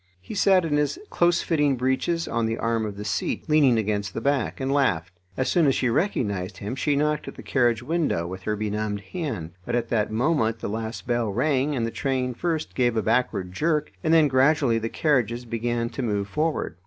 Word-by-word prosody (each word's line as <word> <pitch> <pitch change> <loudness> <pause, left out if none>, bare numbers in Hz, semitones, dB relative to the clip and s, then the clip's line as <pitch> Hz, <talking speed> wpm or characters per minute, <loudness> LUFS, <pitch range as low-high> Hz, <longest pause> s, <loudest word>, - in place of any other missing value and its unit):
He 90 - -9
sat 190 -2 +4
in 145 -2 +1
his 150 - 0
closefitting 160 -5 +2
breeches 130 +7 0
on 115 -1 0
the 115 - -2
arm 115 -1 0
of 100 -1 -7
the 105 - -6
seat, - - -2
leaning 145 -6 +4
against 100 -2 -1
the - - -1
back, 140 -4 0
and 135 0 -1
laughed. 95 - +1 0.2
As 130 - 0
soon 170 -4 +3
as 135 - +3
she 125 - +1
recognised 100 - -1
him 105 +4 -5
she 145 +1 +1
knocked 150 +1 0
at - - -7
the - - -10
carriage 120 -3 +1
window 150 - 0
with 95 +2 -6
her 105 +3 -1
benumbed 105 0 -2
hand, 140 - -3
but 120 - -2
at 120 -1 -1
that 110 -3 +1
moment 115 -1 +1
the - - -5
last 110 +2 -4
bell 120 -2 0
rang, 135 +5 +1
and 115 -3 0
the 115 - -3
train 130 -1 -1
first 160 +4 -2
gave 120 -3 +1
a 110 - +1
backward 110 -6 0
jerk, 150 - 0
and 160 - +1
then 160 -2 +6
gradually 135 -3 +3
the 115 0 -3
carriages 125 -6 0
began 115 0 -1
to 125 - -4
move 105 -4 -1
forward. 150 - -2
120 Hz, 210 wpm, -25 LUFS, 110-150 Hz, 0.2 s, then